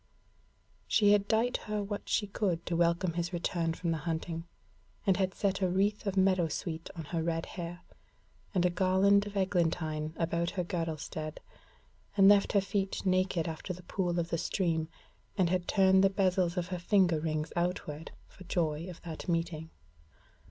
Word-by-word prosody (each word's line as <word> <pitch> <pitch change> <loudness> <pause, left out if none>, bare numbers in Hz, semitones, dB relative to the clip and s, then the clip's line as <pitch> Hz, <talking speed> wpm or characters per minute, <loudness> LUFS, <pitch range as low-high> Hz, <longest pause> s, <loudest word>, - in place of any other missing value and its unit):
She 205 -2 +4
had 205 -1 +3
dight 230 +2 +2
her 210 -1 -1
what 205 0 -5
she 210 - +2
could 195 -4 -1
to 175 - -1
welcome 170 +1 +2
his 170 +1 -2
return 170 -2 -1
from 170 -1 -2
the 160 - -1
hunting, 165 0 -3 0.6
and 195 -3 +4
had 190 -1 0
set 195 -1 0
a 185 - +2
wreath 200 +3 +1
of 200 0 -1
meadow 185 -3 +4
sweet 160 +1 -4
on 165 - -5
her 165 - +1
red 165 0 -1
hair, 175 0 -7 0.7
and 180 -1 +3
a 180 - +3
garland 190 +3 +3
of 205 0 -6
eglantine 165 -4 0
about 170 0 0
her 180 - +1
girdlestead, 160 -3 -4 0.8
and 195 -1 +7
left 200 -1 +5
her 200 - +5
feet 195 0 -2
naked 185 -3 +1
after 165 +3 -4
the 180 +1 -11
pool 175 -1 -1
of 170 0 -2
the 165 - -1
stream, 165 -4 0 0.5
and 180 -3 +2
had 180 -1 0
turned 190 -1 +5
the 195 - +6
bezels 185 -2 +1
of 180 0 -1
her 180 -1 -3
finger 175 -3 +3
rings 155 0 -2
outward, 170 -3 -2 0.2
for 185 - -14
joy 165 -1 -1
of 175 - -10
that 165 +1 -7
meeting. 165 -1 -1
175 Hz, 175 wpm, -31 LUFS, 165-195 Hz, 0.8 s, and